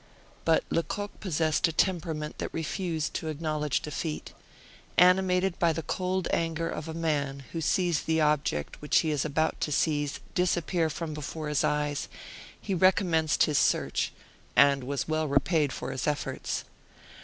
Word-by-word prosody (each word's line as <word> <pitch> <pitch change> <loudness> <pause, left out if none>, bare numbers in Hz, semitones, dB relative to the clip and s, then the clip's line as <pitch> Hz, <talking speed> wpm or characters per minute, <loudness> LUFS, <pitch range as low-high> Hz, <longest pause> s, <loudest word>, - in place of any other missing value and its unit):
But 165 -1 +4
Lecoq 205 +5 -2
possessed 160 -3 +1
a - - -2
temperament 160 -3 -1
that - - -3
refused 165 -1 -2
to 160 - -3
acknowledge 155 -2 -1
defeat. 150 +1 -4 0.6
Animated 180 0 +4
by 170 -1 +3
the 165 +1 -4
cold 185 +1 -1
anger 165 0 0
of 155 - -5
a 160 - -5
man 145 -4 -1
who 165 - -3
sees 175 0 +1
the 160 0 0
object 150 - 0
which 150 - +3
he 160 - -1
was 145 -1 0
about 155 +2 0
to 150 - -1
seize 145 -1 0
disappear 175 -2 +1
from 160 0 -4
before 150 +1 -5
his 150 - +1
eyes, 150 -1 0 0.5
he 200 - -3
recommenced 175 -4 +3
his 150 -2 +2
search, - - +1 0.4
and 140 -2 +5
was 140 +1 -2
well 155 0 0
repaid 145 +1 +2
for 130 - -5
his 130 0 -3
efforts. 145 -1 -2
160 Hz, 155 wpm, -28 LUFS, 150-170 Hz, 0.6 s, and